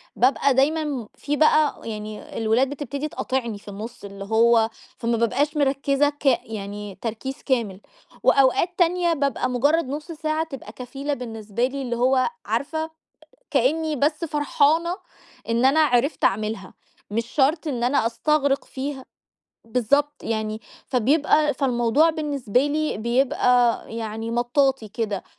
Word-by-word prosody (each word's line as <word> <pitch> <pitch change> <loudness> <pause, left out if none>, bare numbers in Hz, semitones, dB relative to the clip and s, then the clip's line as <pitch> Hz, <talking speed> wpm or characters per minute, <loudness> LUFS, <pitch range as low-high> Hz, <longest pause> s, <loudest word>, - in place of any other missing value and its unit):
بابقى 270 +2 +3
دايمًا 300 +5 +2
م 270 -7 -4
في 295 +1 -2
بقى 310 -1 +4
ويعني 215 -1 -7
الولاد 230 +4 +2
بتبتدي 285 +1 -4
تقاطِعني 255 -6 -3
في 200 - -19
النُص 215 +4 -8
اللي 200 0 -8
هو 225 +1 +4 0.3
فما 230 0 0
بابقاش 285 +7 +1
مركزة 280 0 +2
ك 290 0 -13
يعني 210 -6 -1
تركيز 245 +5 -5
كامل. 220 -8 -1 0.4
وأوقات 275 +5 +4
تانية 350 -1 +2
بابقى 280 -4 0
مجرّد 285 +5 +2
نُص 300 +4 -5
ساعة 310 0 -1
تبقى 270 -9 -9
كفيلة 270 +5 -5
بالنسبة 225 -3 -3
لي 275 +2 -4
اللي 240 -2 -2
هو 255 - +3 0.2
عارفة 315 +2 -2 0.6
كأني 305 +4 +1
بس 300 +4 0
فرحانة 310 +3 +1 0.5
إن 235 +2 +2
أنا 275 +4 +5
عرفت 280 -1 +2
أعملها، 210 -1 0 0.4
مش 230 +2 -1
شرط 300 +5 +1
إن 245 -5 -2
أنا 255 -1 +2
أستغرِق 280 +3 +1
فيها. 265 -1 -5 0.6
بالضبط 255 +6 +1
يعني، 220 -1 -2 0.3
فبيبقي 290 +3 +2
فالموضوع 260 +4 +3
بالنسبة 285 -5 0
لي 305 +1 -1
بيبقى 245 0 +2
يعني 225 0 -4
مطاطي 245 0 +1
كده 210 -2 -3
265 Hz, 130 wpm, -23 LUFS, 230-290 Hz, 0.6 s, أنا